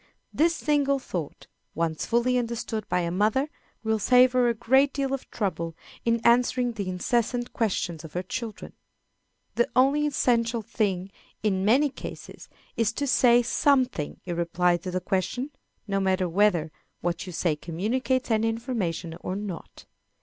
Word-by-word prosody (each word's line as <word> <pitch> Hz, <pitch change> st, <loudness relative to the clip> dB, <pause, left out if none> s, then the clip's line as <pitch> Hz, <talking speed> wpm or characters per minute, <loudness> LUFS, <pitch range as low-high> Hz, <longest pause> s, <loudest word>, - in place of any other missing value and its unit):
This 330 Hz, +2 st, +3 dB
single 285 Hz, -2 st, +1 dB
thought, 175 Hz, -, -6 dB, 0.3 s
once 165 Hz, -1 st, -1 dB
fully 240 Hz, +2 st, +2 dB
understood 230 Hz, -2 st, -4 dB
by 180 Hz, -, +1 dB
a 170 Hz, -1 st, -2 dB
mother, 215 Hz, -, +1 dB, 0.3 s
will 220 Hz, 0 st, +1 dB
save 250 Hz, +4 st, +5 dB
her 250 Hz, -1 st, +3 dB
a 235 Hz, -, 0 dB
great 265 Hz, +5 st, +3 dB
deal 275 Hz, -2 st, -1 dB
of 270 Hz, -, -4 dB
trouble 165 Hz, -6 st, -3 dB, 0.3 s
in 230 Hz, 0 st, +2 dB
answering 245 Hz, +1 st, +3 dB
the 205 Hz, -5 st, -4 dB
incessant 240 Hz, +6 st, -1 dB
questions 180 Hz, -7 st, -1 dB
of 160 Hz, -, -10 dB
her 180 Hz, -, -2 dB
children. 225 Hz, +3 st, -6 dB, 0.8 s
The 240 Hz, -, +1 dB
only 280 Hz, +4 st, +4 dB
essential 235 Hz, -4 st, +1 dB
thing 195 Hz, -3 st, -1 dB, 0.3 s
in 190 Hz, -3 st, +1 dB
many 265 Hz, +8 st, +4 dB
cases -, -, -9 dB, 0.3 s
is 225 Hz, -2 st, +1 dB
to 285 Hz, -, -2 dB
say 245 Hz, -2 st, +5 dB
something 255 Hz, -, +1 dB
in 175 Hz, -2 st, -3 dB
reply 175 Hz, +1 st, +2 dB
to 185 Hz, +1 st, -7 dB
the 180 Hz, 0 st, -2 dB
question, 205 Hz, -, -2 dB, 0.4 s
no 195 Hz, -1 st, 0 dB
matter 190 Hz, -1 st, +1 dB
whether 175 Hz, -3 st, +2 dB, 0.3 s
what 175 Hz, +2 st, -2 dB
you -, -, -5 dB
say 165 Hz, -2 st, 0 dB
communicates 230 Hz, -, -1 dB
any 220 Hz, 0 st, +2 dB
information 220 Hz, -9 st, -3 dB
or 185 Hz, -, -4 dB
not. 200 Hz, -4 st, -7 dB
220 Hz, 155 wpm, -26 LUFS, 180-250 Hz, 0.8 s, save